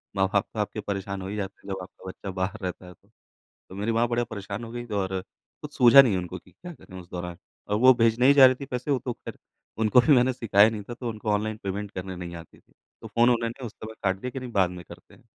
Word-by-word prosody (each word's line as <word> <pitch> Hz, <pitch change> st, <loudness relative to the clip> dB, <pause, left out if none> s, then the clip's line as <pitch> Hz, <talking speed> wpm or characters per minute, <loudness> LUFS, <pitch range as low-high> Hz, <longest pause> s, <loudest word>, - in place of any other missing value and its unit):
माँ-बाप 95 Hz, +1 st, +2 dB
तो 110 Hz, -, -5 dB
आपके 105 Hz, +1 st, -2 dB
परेशान 100 Hz, -1 st, -4 dB
हो 95 Hz, -, -6 dB
ही 100 Hz, -, -5 dB
जाते 100 Hz, -2 st, -4 dB
हैं, 100 Hz, -, -8 dB
जब 95 Hz, -, -5 dB
आपका 95 Hz, +1 st, -13 dB
बच्चा 95 Hz, -, -8 dB
बाहर 95 Hz, +4 st, -3 dB
रहता 90 Hz, 0 st, -5 dB
है, 90 Hz, -, -11 dB
तो। 100 Hz, +4 st, -32 dB, 0.6 s
तो 95 Hz, -, -10 dB
मेरी 105 Hz, +3 st, -1 dB
माँ 115 Hz, +1 st, +2 dB
बड़ी 120 Hz, 0 st, 0 dB
परेशान 100 Hz, +1 st, -6 dB
हो 115 Hz, -, -8 dB
गई 120 Hz, 0 st, -6 dB
और 95 Hz, -3 st, -2 dB, 0.4 s
कुछ -, -, -8 dB
सूझा 125 Hz, +3 st, +9 dB
नहीं 115 Hz, -8 st, +1 dB
उनको 90 Hz, 0 st, -5 dB
कि -, -, -22 dB
क्या 180 Hz, -1 st, -11 dB
करें 95 Hz, -10 st, -12 dB
उस 90 Hz, -, -13 dB
दौरान 90 Hz, -1 st, -5 dB, 0.3 s
और 105 Hz, -, 0 dB
वो 130 Hz, +2 st, +8 dB
भेजने 115 Hz, +1 st, +3 dB
ही 140 Hz, -, +7 dB
जा 140 Hz, -2 st, +9 dB
रही 130 Hz, 0 st, +5 dB
थी 140 Hz, -, -8 dB
पैसे। 125 Hz, +1 st, -4 dB
वो 135 Hz, -, +2 dB
तो 125 Hz, -, -2 dB
ख़ैर -, -, -10 dB, 0.4 s
उनको 110 Hz, +3 st, +5 dB
अभी 125 Hz, +5 st, +5 dB
मैंने 125 Hz, +1 st, +3 dB
सिखाया 110 Hz, -3 st, +4 dB
नहीं 110 Hz, -2 st, -6 dB
था, 120 Hz, -, -8 dB
तो 120 Hz, 0 st, -5 dB
उनको 110 Hz, -1 st, -5 dB
ऑनलाइन 105 Hz, +1 st, -1 dB
पेमेंट 100 Hz, +1 st, -4 dB
करने 95 Hz, 0 st, -6 dB
नहीं 90 Hz, -1 st, -7 dB
आती 85 Hz, -1 st, -12 dB
थी। -, -, -32 dB, 0.3 s
तो -, -, -8 dB
फ़ोन 120 Hz, +1 st, +3 dB
उन्होंने 120 Hz, +1 st, -1 dB
उस 115 Hz, -, -6 dB
समय 110 Hz, 0 st, -9 dB
काट 95 Hz, -1 st, +1 dB
दिया 125 Hz, -, -4 dB
कि 135 Hz, -, -5 dB
नहीं 125 Hz, -1 st, -7 dB
बाद 95 Hz, -5 st, +2 dB
में 90 Hz, 0 st, -9 dB
करते -, -, -15 dB
हैं। -, -, -20 dB
105 Hz, 275 wpm, -26 LUFS, 95-120 Hz, 0.6 s, सूझा